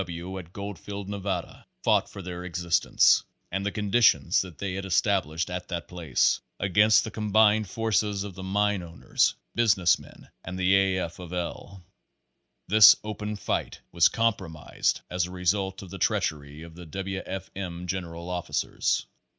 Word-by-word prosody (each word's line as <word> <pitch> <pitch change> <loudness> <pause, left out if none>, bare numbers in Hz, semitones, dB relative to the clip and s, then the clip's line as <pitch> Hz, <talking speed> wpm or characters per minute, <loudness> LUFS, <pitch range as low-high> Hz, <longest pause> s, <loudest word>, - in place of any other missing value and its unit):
W. 85 -2 -7
W. 95 +1 -6
at 85 -2 -12
Goldfield, 100 0 -7
Nevada, 100 -3 -4 0.2
fought - - +2
for 100 - -9
their 90 0 -6
existence 90 -1 +3 0.3
(and 95 +2 -2
the 100 - -1
conditions 105 +4 +3
that 90 -5 -9
they 100 -2 -3
had 95 +1 -4
established 90 -3 0
at 90 0 -5
that 85 -4 -5
place) 85 -7 +1 0.2
against 105 +3 +4
the 110 - -6
combined 110 -1 +3
forces 105 -3 0
of 100 -2 -7
the 95 - -9
mine 100 +1 0
owners, 85 -1 0 0.2
business 95 -7 +3
men - - -15 0.2
and 95 +1 -6
A. 95 0 +3
F. 85 -2 -4
of 90 -1 -8
L. 90 +2 -5 0.8
This 110 +1 +9
open 105 0 -4
fight 100 - -3
was 85 -1 +5
compromised 95 -10 -1
as 90 -1 0
a - - -10
result 95 +2 -1
of 90 - -11
the - - -7
treachery 75 0 -1
of 85 -1 -11
the 85 0 -11
W. 95 +3 -4
F. 95 0 -6
M. 90 -2 -5
general 85 -2 -5
officers. 90 -1 -1
95 Hz, 160 wpm, -27 LUFS, 85-100 Hz, 0.8 s, This